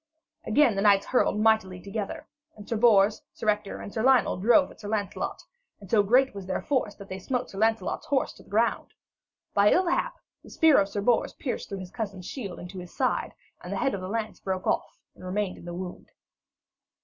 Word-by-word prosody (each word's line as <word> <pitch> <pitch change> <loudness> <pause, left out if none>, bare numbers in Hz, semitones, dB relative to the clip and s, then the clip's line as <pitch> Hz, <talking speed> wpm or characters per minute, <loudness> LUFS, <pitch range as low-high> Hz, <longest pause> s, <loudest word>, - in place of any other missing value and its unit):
Again 230 0 +4
the 195 - 0
knights 200 -1 +5
hurtled 250 -4 +1
mightily 215 -4 +2
together, 200 +2 -5 0.3
and 210 -1 -12
Sir 230 - -1
Bors, 215 -2 +4
Sir - - -6
Ector, 210 -1 -1
and 205 - -8
Sir 220 - -1
Lionel 260 +1 +4
drove 240 - +4
at - - -17
Sir 210 - -8
Lancelot, 205 -2 -3 0.4
and 195 -2 -13
so 215 - +5
great 250 +6 +3
was 195 -2 -8
their 190 - -2
force 255 -7 0
that 200 -2 -11
they 190 0 -6
smote 250 +5 -3
Sir 195 - -7
Lancelot's 225 +1 0
horse 275 -2 0
to - - -16
the - - -20
ground. 225 +3 0 0.6
By 205 +1 +5
ill 370 - +4
hap, - - 0 0.3
the - - -15
spear 320 -3 +5
of 195 - -1
Sir 205 - -3
Bors 235 +3 +2
pierced 265 - -4
through 195 -1 -5
his 180 -1 -9
cousin's 200 -5 -5
shield 200 -5 -6
into 180 +1 -8
his 180 -1 -11
side, - - 0 0.3
and - - -7
the - - -2
head 270 - +1
of 195 - -3
the 185 - -5
lance 220 0 -3
broke 190 -1 -3
off - - -1 0.2
and - - -16
remained 185 +1 -2
in - - -13
the 175 0 -6
wound. 180 0 -7
205 Hz, 220 wpm, -27 LUFS, 195-230 Hz, 0.6 s, knights